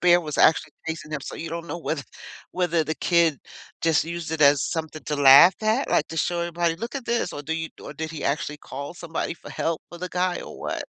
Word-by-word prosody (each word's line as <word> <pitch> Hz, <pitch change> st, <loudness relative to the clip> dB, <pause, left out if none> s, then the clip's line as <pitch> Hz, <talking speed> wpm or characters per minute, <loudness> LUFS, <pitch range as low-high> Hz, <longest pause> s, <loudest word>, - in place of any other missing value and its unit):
bear 175 Hz, 0 st, +5 dB
was 155 Hz, -3 st, -5 dB
actually 155 Hz, -1 st, +4 dB
chasing 160 Hz, -1 st, -5 dB
him, 150 Hz, -, -2 dB
so -, -, -7 dB
you 165 Hz, -, -5 dB
don't 170 Hz, +1 st, -5 dB
know 165 Hz, -, -4 dB
whether 160 Hz, -3 st, -3 dB, 0.5 s
whether 175 Hz, -3 st, +1 dB
the 155 Hz, +1 st, -2 dB
kid 170 Hz, -5 st, +2 dB, 0.4 s
just 165 Hz, -2 st, +2 dB
used 170 Hz, -1 st, -5 dB
it 160 Hz, -, -3 dB
as 140 Hz, -1 st, +6 dB
something 160 Hz, -1 st, -4 dB
to 150 Hz, -, -2 dB
laugh 140 Hz, +6 st, +9 dB
at, 220 Hz, +5 st, +1 dB
like, -, -, +2 dB
to 165 Hz, -, -7 dB
show 170 Hz, +3 st, 0 dB
everybody, 170 Hz, -1 st, 0 dB
"Look 230 Hz, +6 st, -6 dB
at 265 Hz, -, -6 dB
this," 235 Hz, 0 st, 0 dB
or 145 Hz, -, -5 dB
do 160 Hz, +3 st, -3 dB
you 160 Hz, 0 st, -3 dB
or -, -, -8 dB
did 160 Hz, 0 st, -4 dB
he 160 Hz, -, -7 dB
actually 150 Hz, +1 st, -1 dB
call 140 Hz, +1 st, -7 dB
somebody 170 Hz, -1 st, -4 dB
for -, -, -13 dB
help 165 Hz, -1 st, -2 dB
for 175 Hz, -, -10 dB
the 180 Hz, -, -4 dB
guy, 180 Hz, 0 st, 0 dB
or -, -, -10 dB
what. -, -, -3 dB
165 Hz, 245 wpm, -24 LUFS, 155-175 Hz, 0.5 s, laugh